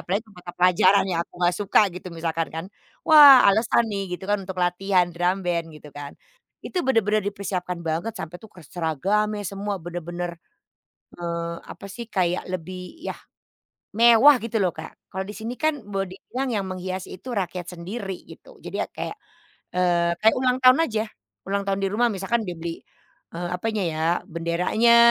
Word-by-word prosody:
Apalagi 205 Hz, +5 st, -2 dB
mata 180 Hz, -3 st, -11 dB
pelajaran 185 Hz, +2 st, +4 dB
yang 170 Hz, -2 st, 0 dB
aku -, -, -53 dB
nggak 175 Hz, 0 st, +3 dB
suka 205 Hz, -2 st, +3 dB
gitu, 180 Hz, +1 st, -8 dB
misalkan 165 Hz, 0 st, -2 dB
kan. 160 Hz, +2 st, -4 dB, 0.4 s
Wah, 290 Hz, -4 st, +9 dB
alasan 220 Hz, +3 st, +3 dB
nih, 195 Hz, -4 st, -3 dB
gitu 190 Hz, -, -11 dB
kan, 205 Hz, -, +2 dB
untuk 185 Hz, 0 st, -7 dB
latihan 180 Hz, 0 st, +2 dB
drum 175 Hz, +3 st, 0 dB
band, 170 Hz, -2 st, 0 dB
gitu 150 Hz, 0 st, -12 dB
kan, 145 Hz, -1 st, -8 dB, 0.5 s
itu 370 Hz, -, -3 dB
bener-bener 215 Hz, -5 st, +2 dB
dipersiapkan 185 Hz, -3 st, -4 dB
banget, 165 Hz, +8 st, -2 dB
sampai 175 Hz, -2 st, -6 dB
tuh 220 Hz, -, -14 dB
ke 180 Hz, -, -14 dB
seragamnya, 195 Hz, +7 st, -1 dB
semua, 200 Hz, +1 st, -3 dB
bener-bener, 175 Hz, +1 st, -5 dB, 0.8 s
eee, 170 Hz, -1 st, -3 dB
apa 195 Hz, -, -10 dB
sih, 235 Hz, +5 st, -7 dB
kayak, 180 Hz, -3 st, 0 dB
lebih, 185 Hz, -, -7 dB
ya, 340 Hz, -, -5 dB, 0.8 s
mewah, 235 Hz, +5 st, +7 dB
gitu 230 Hz, 0 st, -3 dB
loh, 185 Hz, -3 st, +2 dB
Kak. 160 Hz, 0 st, -8 dB, 0.2 s
Kalau 190 Hz, +1 st, -4 dB
di 205 Hz, -, -7 dB
sini 225 Hz, +2 st, -5 dB
kan 310 Hz, -2 st, 0 dB
boleh 195 Hz, -2 st, -3 dB
dibilang 260 Hz, +6 st, -4 dB
yang 205 Hz, -3 st, -1 dB
menghiasi 185 Hz, 0 st, -5 dB
itu 220 Hz, -, -12 dB
rakyat 180 Hz, -4 st, -3 dB
sendiri, 190 Hz, +2 st, -6 dB
gitu. -, -, -15 dB
Jadi -, -, -7 dB
ya -, -, -3 dB
kayak, -, -, -5 dB, 0.6 s
eee, 175 Hz, -1 st, +2 dB
kayak 220 Hz, -, +6 dB
ulang 255 Hz, -1 st, +2 dB
tahun 255 Hz, +1 st, +8 dB
aja. 215 Hz, -2 st, -1 dB, 0.4 s
Ulang 200 Hz, 0 st, 0 dB
tahun 195 Hz, 0 st, 0 dB
di 195 Hz, -, +2 dB
rumah 240 Hz, +3 st, +3 dB
misalkan 200 Hz, +4 st, -1 dB
dia 175 Hz, -, -4 dB
beli, 165 Hz, 0 st, -5 dB, 0.5 s
eee, 175 Hz, +1 st, -4 dB
apanya 210 Hz, +3 st, -2 dB
ya, 160 Hz, -1 st, -2 dB, 0.2 s
benderanya 180 Hz, +7 st, +2 dB
185 Hz, 170 wpm, -24 LUFS, 175-215 Hz, 0.8 s, Wah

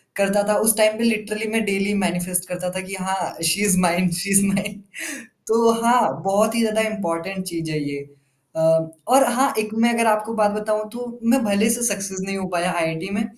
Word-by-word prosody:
करता 200 Hz, +1 st, +2 dB
था 210 Hz, -, +3 dB
उस 220 Hz, 0 st, +5 dB
टाइम 215 Hz, 0 st, +4 dB
पे 230 Hz, -, -2 dB
लिटरली 215 Hz, -1 st, -1 dB
मैं 225 Hz, 0 st, +1 dB
डेली 200 Hz, 0 st, 0 dB
मैनिफेस्ट 175 Hz, +1 st, -2 dB
करता 180 Hz, 0 st, -4 dB
था 185 Hz, -, -2 dB
कि 195 Hz, -, -5 dB
हाँ, 190 Hz, -2 st, -2 dB
she 165 Hz, +5 st, +2 dB
is 195 Hz, -3 st, +3 dB
mine 180 Hz, 0 st, +2 dB
she 175 Hz, +4 st, -3 dB
is 195 Hz, 0 st, +5 dB
mine, 200 Hz, +1 st, -2 dB, 0.7 s
तो 230 Hz, +1 st, +4 dB
हाँ, 240 Hz, +1 st, +5 dB, 0.2 s
बहुत 210 Hz, +3 st, +2 dB
ही -, -, +1 dB
ज़्यादा 220 Hz, -1 st, +1 dB
इम्पोर्टेंट 190 Hz, -2 st, -4 dB
चीज़ 165 Hz, -3 st, -5 dB
है 155 Hz, -, -2 dB
ये। 140 Hz, -, -5 dB, 0.6 s
अ, -, -, -3 dB, 0.5 s
और 265 Hz, +2 st, +6 dB
हाँ, 270 Hz, +3 st, +2 dB
एक 215 Hz, 0 st, -3 dB
मैं 230 Hz, +1 st, +3 dB
अगर 230 Hz, 0 st, +1 dB
आपको 215 Hz, 0 st, +1 dB
एक 225 Hz, -, -6 dB
बात 210 Hz, -1 st, +3 dB
बताऊँ 215 Hz, 0 st, -2 dB
तो, 240 Hz, +1 st, -8 dB
मैं 245 Hz, +3 st, +3 dB
भले 210 Hz, +1 st, +2 dB
से 235 Hz, +1 st, 0 dB
सक्सेस 195 Hz, -1 st, -5 dB
नहीं 195 Hz, 0 st, -3 dB
हो 190 Hz, -1 st, -4 dB
पाया 180 Hz, 0 st, -1 dB
आईआईटी 165 Hz, +2 st, -2 dB
में, 220 Hz, +2 st, 0 dB
205 Hz, 215 wpm, -21 LUFS, 185-220 Hz, 0.7 s, और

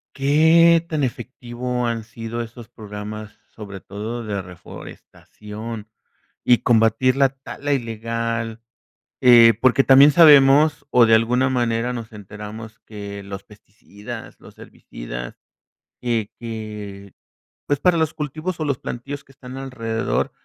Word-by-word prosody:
¿Qué 160 Hz, +4 st, +4 dB
tan 155 Hz, -3 st, -1 dB
efectivo 125 Hz, 0 st, -4 dB
han 115 Hz, -1 st, -2 dB
sido 115 Hz, +1 st, -6 dB
esos 115 Hz, 0 st, -9 dB
programas, 105 Hz, -1 st, -9 dB, 0.2 s
sobre 100 Hz, -3 st, -9 dB
todo 110 Hz, +5 st, -6 dB
de 105 Hz, -3 st, -3 dB
reforestación 105 Hz, +4 st, -10 dB, 0.6 s
y 120 Hz, -, +5 dB
combatir 115 Hz, +2 st, +2 dB
la 135 Hz, -1 st, +3 dB
tala 140 Hz, +2 st, -5 dB
ilegal? 115 Hz, -2 st, -3 dB, 0.6 s
Eh, 120 Hz, -3 st, +8 dB
porque 130 Hz, +1 st, +4 dB
también 135 Hz, +2 st, +7 dB
sabemos, 145 Hz, -1 st, +6 dB
o 120 Hz, -2 st, +6 dB
de 115 Hz, -, +3 dB
alguna 125 Hz, +4 st, +2 dB
manera 120 Hz, -1 st, 0 dB
nos 115 Hz, -3 st, -7 dB
enteramos, 105 Hz, +2 st, -10 dB
que 100 Hz, -1 st, -8 dB
los 100 Hz, 0 st, -8 dB
pesticidas, 105 Hz, +2 st, -12 dB
los -, -, -16 dB
herbicidas, -, -, -9 dB, 0.6 s
que 115 Hz, -4 st, -2 dB
que, 105 Hz, -4 st, -8 dB, 0.5 s
pues, 145 Hz, -1 st, 0 dB
para 180 Hz, 0 st, +3 dB
los 160 Hz, -1 st, 0 dB
cultivos 155 Hz, +3 st, -5 dB
o 155 Hz, -, -2 dB
los 140 Hz, -3 st, -1 dB
plantíos 140 Hz, +4 st, -7 dB
que 135 Hz, -, -21 dB
están 130 Hz, -1 st, -11 dB
alrededor 115 Hz, -4 st, -3 dB
115 Hz, 125 wpm, -21 LUFS, 110-135 Hz, 0.6 s, Eh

